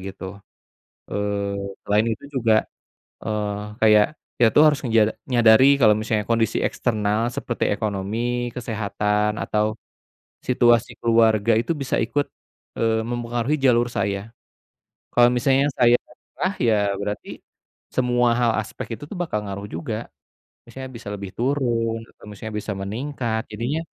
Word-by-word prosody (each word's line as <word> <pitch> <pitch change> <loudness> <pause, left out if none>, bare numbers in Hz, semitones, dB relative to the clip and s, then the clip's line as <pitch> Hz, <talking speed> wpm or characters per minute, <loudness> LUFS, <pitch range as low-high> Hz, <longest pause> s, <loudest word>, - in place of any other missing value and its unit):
gitu. 95 +1 -8 0.7
Eee, 100 0 -2 0.3
selain 105 +2 +2
itu 115 +3 -3
juga, 115 -6 +3 0.6
eee, 105 -1 -2 0.2
kayak 105 -1 +6 0.3
kita 120 -2 +5
tuh 150 - +7
harus 150 -2 +4
ngeja 115 -1 +4 0.3
nyadari 125 +3 +6
kalau 110 -3 +7
misalnya 110 -1 -1
kondisi 115 -1 +1
eksternal 110 0 0
seperti 120 -4 -1
ekonomi, 115 +4 -2
kesehatan, 105 -2 -1
atau 105 0 0 0.7
situasi 120 -2 +2
keluarga 115 -1 +3
itu 115 +9 +1
bisa 140 -3 -1
ikut, 145 +6 0 0.6
eee, 110 -1 +1
mempengaruhi 120 +4 -2
jalur 120 -2 +3
saya. 100 +2 -2 0.8
Kalau 120 0 +6
misalnya 135 +2 +3
saya 120 -1 +5
nyerah, 185 +9 -5
ya, 115 -3 +3 0.2
berarti 105 +1 -5 0.5
semua 125 -1 +2
hal 120 -2 +3
aspek 110 +2 -7
itu - - -11
tuh - - -7
bakal 170 -11 -2
ngaruh 100 +1 -5
juga. 115 -6 -5 0.6
Misalnya 130 0 -8
bisa 115 - -9
lebih 100 -1 -6
turun, 120 -3 0 0.2
atau - - -19
misalnya 105 +1 -8
bisa 105 0 -3
meningkat. 110 +3 -3
Jadinya, 120 +9 -2
115 Hz, 130 wpm, -23 LUFS, 105-120 Hz, 0.8 s, tuh